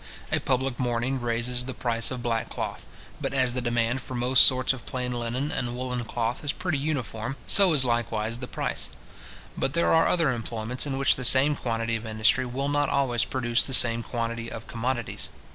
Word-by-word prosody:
A - - +2
public 130 0 -1
mourning 125 +1 -1
raises 120 +1 -1
the 130 - -6
price 115 -2 -1
of 125 -2 -6
black 115 -2 -2
cloth. - - -6 0.3
But - - -3
as 130 -2 +2
the 125 - -2
demand 120 +1 0
for 130 - -8
most 125 +2 +6
sorts 130 0 +2
of 130 - -11
plain 125 -1 -3
linen 120 +4 -3
and 120 -1 -3
woollen 125 -1 -3
cloth 120 +3 -3
is 145 - 0
pretty 175 -5 -3
uniform, 135 -4 -3
so 195 -3 +5
is 135 -4 +3
likewise 115 -1 -1
the 125 - -6
price. - - -3 0.7
But 135 - -2
there 170 - +2
are 165 - +4
other 165 -6 +2
employments 120 +2 -3
in 135 -1 -3
which 135 0 +3
the 130 - -5
same 135 +4 +7
quantity 115 -3 -2
of 110 0 -5
industry 110 +4 +2
will 135 +3 -3
not 145 0 0
always 130 -4 +1
produce 120 -2 +1
the 130 - +3
same 115 -1 +5
quantity 115 -1 -4
of 110 - -8
commodities. 120 0 -3
125 Hz, 195 wpm, -26 LUFS, 115-130 Hz, 0.7 s, same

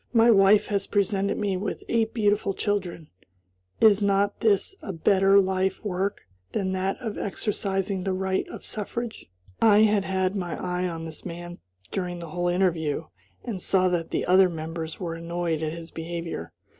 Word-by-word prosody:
My 230 0 +6
wife 200 0 +6
has 200 -2 -1
presented 200 -1 +1
me 200 -3 0
with 200 +3 -4
eight 225 -1 +1
beautiful 205 -3 +1
children; 185 -6 -2 0.7
is 210 -2 +6
not 200 0 +2
this 220 - +2
a 200 - -5
better 195 +3 +4
life 190 +1 0
work 195 0 -1 0.3
than 190 -2 -1
that 190 +1 -1
of 225 -5 -4
exercising 195 -2 -2
the 190 - -1
right 190 0 -1
of - - -9
suffrage?" 220 - -5 0.3
I 215 -2 +6
had 210 -2 +3
had 190 0 0
my 180 -4 -3
eye 180 0 -1
on 165 -2 -5
this 160 -1 -7
man 175 0 -7 0.3
during 180 -2 -3
the 170 -1 -8
whole 175 +2 -1
interview, 165 -4 0 0.3
and 215 -7 -4
saw 185 0 +3
that 175 -2 -1
the - - -1
other 185 +1 +5
members 160 0 -5
were 170 -3 -3
annoyed 170 -1 -2
at 155 -1 -1
his 165 0 -8
behavior. 170 +1 -5
190 Hz, 170 wpm, -26 LUFS, 175-200 Hz, 0.7 s, My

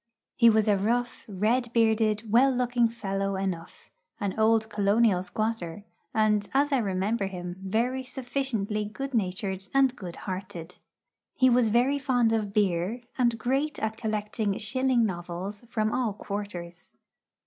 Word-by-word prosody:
He 235 -1 +6
was 220 -1 +3
a 205 -2 +3
rough, 240 +4 -1
red 225 +5 0
bearded, 220 -1 +2
well 250 +4 +6
looking 245 -2 +2
fellow 195 -3 -2
enough 185 -3 -5 0.3
an 200 -4 -1
old 220 0 +3
colonial 205 -2 +2
squatter 205 -2 -3 0.3
and, 210 -2 +2
as 290 +2 +3
I 275 - +3
remember 200 0 -1
him, 180 -1 -6
very 240 +7 0
sufficiently 245 -5 -2
good 270 +6 -6
natured 190 -2 -2
and 265 -2 +4
good 180 -7 -7
hearted. 185 -2 -7 0.6
He 260 -1 +4
was 240 -2 +4
very 250 +6 +2
fond 245 -5 +2
of 215 -3 -1
beer, 200 +2 0 0.2
and 240 -2 +2
great 270 +6 -1
at 220 0 -2
collecting 215 -2 -2
shilling 250 +2 +2
novels 185 +3 -5
from 215 -2 0
all 245 -5 0
quarters. 195 -4 -6
215 Hz, 140 wpm, -27 LUFS, 195-240 Hz, 0.6 s, He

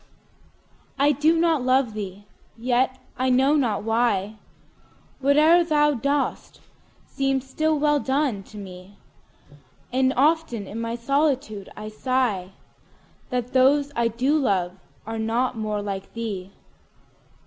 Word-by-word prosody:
I 285 +2 +4
do 305 +4 +2
not 325 -4 +2
love 255 -2 +2
thee!—yet, 225 +6 -3 0.2
I 260 0 +1
know 265 +4 +4
not 235 -9 0
why, 220 -2 0 0.8
5 - - -34
Whate'er 305 +5 +5
thou 295 -2 +3
dost 280 +3 -2 0.5
seems 270 -1 -1
still 310 +3 0
well 295 0 +2
done, 270 -6 0
to 215 - -13
me: 190 0 -11 1.0
And 260 0 +3
often 290 -7 +1
in 220 +4 -6
my 230 0 -3
solitude 260 -5 -1
I 215 0 -6
sigh 215 -5 -1 0.8
That 250 -1 -3
those 280 +2 +4
I 235 0 +2
do 260 +7 +1
love 190 -9 +1 0.3
are 225 +1 -4
not 235 +3 0
more 215 -2 -3
like 195 -1 -5
thee! 200 -5 -5
250 Hz, 125 wpm, -24 LUFS, 215-280 Hz, 1.0 s, Whate'er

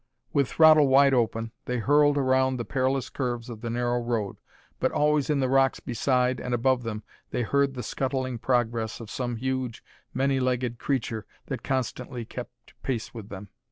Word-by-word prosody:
With 140 -2 +3
throttle 155 -2 +6
wide 135 +1 +5
open 115 -2 0
they 125 - -1
hurtled 145 +4 +4
around 130 -1 +2
the 120 - -4
perilous 130 0 0
curves 120 -3 -3
of 110 -2 -9
the 115 - -4
narrow 120 +1 0
road, 115 -4 -2 0.4
but - - +1
always 150 -1 +2
in 145 -2 +2
the 130 - +2
rocks 135 0 +3
beside 125 +1 +1
and 125 -1 -1
above 130 +1 +2
them 110 -2 -5 0.3
they 125 - -1
heard 140 +3 +1
the 125 - -4
scuttling 130 -2 -2
progress 115 -2 0
of 115 -3 -9
some 120 -2 -2
huge, 130 0 -3 0.3
many 135 +1 +1
legged 125 -2 -1
creature 115 -5 -2 0.2
that - - -3
constantly 130 -2 -3
kept - - -10
pace 120 -4 -3
with 110 -3 -9
them. 100 0 -8
125 Hz, 175 wpm, -27 LUFS, 120-135 Hz, 0.4 s, throttle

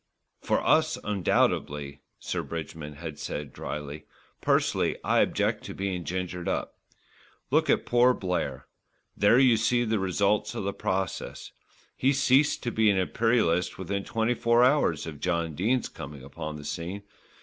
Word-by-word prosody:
"For - - 0
us, - - +3
undoubtedly," 75 -7 0 0.2
Sir - - -3
Bridgman 80 -2 -6
had 80 0 -7
said 75 -3 -5
drily. 75 0 -6 0.4
"Personally - - +1
I - - +3
object - - +1
to - - -7
being 95 -3 -3
gingered 90 -1 -4
up. - - -3 0.7
Look - - +3
at - - +3
poor 125 +1 +4
Blair. 90 -2 -3 0.5
There 105 +4 +5
you 125 -3 +5
see 120 +2 +2
the 110 -1 0
results 100 +2 +1
of - - -3
the 100 +1 -2
process. 95 -2 -3 0.4
He 135 +2 +2
ceased 135 +2 +3
to 120 - -1
be 110 -1 +3
an 100 - +3
Imperialist 95 -3 +1
within 100 +2 -3
twenty 115 +3 0
four 115 0 +3
hours 125 - +3
of 75 -3 -7
John 85 -2 -1
Dene's 110 - 0
coming 70 -1 -9
upon 75 +3 -6
the 75 -1 -9
scene. 90 +6 -5
95 Hz, 150 wpm, -27 LUFS, 80-115 Hz, 0.7 s, There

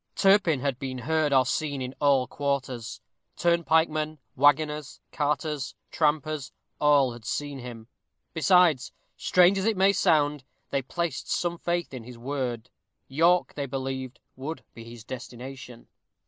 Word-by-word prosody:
Turpin 195 -8 +4
had 135 -3 -1
been 130 -1 -4
heard 155 +2 0
or 130 -2 +5
seen 145 +1 -1
in 130 0 -4
all 140 -3 +4
quarters. 130 -4 -3 0.4
Turnpike 170 -1 +3
men, 155 0 -3 0.2
waggoners, 145 +1 +2
carters, 150 -2 -2 0.2
trampers, 155 -3 0 0.3
all 145 -4 +4
had 120 -1 -12
seen 145 +3 -3
him. 120 -3 -9 0.5
Besides, 165 -5 +4 0.2
strange 180 +2 +4
as 190 - -2
it 220 -3 +1
may 195 +1 +5
sound, 150 -7 +2 0.3
they 140 - +1
placed 165 +2 -3
some 175 -1 -1
faith 175 -3 -2
in 125 -3 -6
his 120 +1 -11
word. 125 -2 -4 0.4
York 170 +6 +3
they 140 -1 -4
believed 130 -1 -4 0.2
would 145 +5 -6
be 115 - -10
his 115 -1 -11
destination. 125 0 -9
145 Hz, 140 wpm, -27 LUFS, 130-160 Hz, 0.5 s, or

